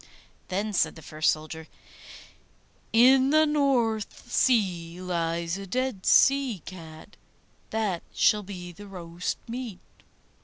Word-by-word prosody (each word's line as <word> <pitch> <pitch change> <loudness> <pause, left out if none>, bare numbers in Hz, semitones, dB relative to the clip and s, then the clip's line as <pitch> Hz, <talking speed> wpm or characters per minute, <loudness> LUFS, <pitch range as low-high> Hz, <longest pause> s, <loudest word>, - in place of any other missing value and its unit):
Then 205 +3 -2
said - - +1
the 160 - -12
first 155 +1 0
soldier, 155 +1 -6 1.2
'In 260 +3 +6
the 310 +2 +5
North 245 -7 0
Sea 180 -10 +1
lies 170 0 -2
a 195 - -8
dead 255 -2 -2
sea 270 - +4
cat; 165 0 -11 0.5
that 210 -6 -1
shall 210 - +3
be 185 -3 -8
the 205 +4 -12
roast 175 -2 -5
meat. 235 -5 -6
195 Hz, 115 wpm, -27 LUFS, 170-240 Hz, 1.2 s, In